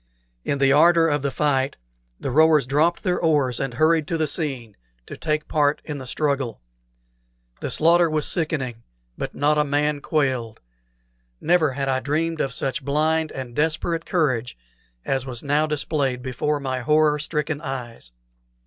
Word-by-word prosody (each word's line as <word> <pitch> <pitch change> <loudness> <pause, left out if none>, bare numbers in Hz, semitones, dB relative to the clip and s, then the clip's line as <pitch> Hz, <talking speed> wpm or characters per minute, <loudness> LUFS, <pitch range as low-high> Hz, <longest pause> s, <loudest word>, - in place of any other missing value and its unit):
In 140 - -1
the 135 0 +3
ardor 165 +2 +5
of 145 -2 0
the 140 - -1
fight 135 -1 0 0.4
the 135 - -3
rowers 155 0 +4
dropped 150 +6 +1
their 180 -1 0
oars 145 -7 +2
and 135 -3 -3
hurried 155 +2 +2
to 165 - -1
the 160 - +1
scene, 135 - -3 0.3
to - - -8
take 150 -1 -2
part 150 -1 +1
in 150 -2 -5
the 130 - -8
struggle. 140 -5 -1 1.0
The - - -4
slaughter 170 +1 +4
was 155 -1 0
sickening, 140 -9 -1 0.3
but - - -5
not 150 +1 +2
a - - +4
man 145 0 0
quailed. 130 -8 -1 0.8
Never 160 -4 +2
had 135 +1 -3
I 130 -1 +1
dreamed 160 +4 -1
of 135 - -1
such 130 +1 -2
blind 155 +2 0
and 125 -3 -7
desperate 160 +2 -1
courage 130 - 0 0.5
as 135 -1 -1
was 120 -2 -5
now 150 +2 +1
displayed 140 -4 -1
before 140 +4 -1
my 130 -2 -3
horror 150 +3 +2
stricken 150 0 -2
eyes. 125 - -6
145 Hz, 160 wpm, -23 LUFS, 135-155 Hz, 1.0 s, ardor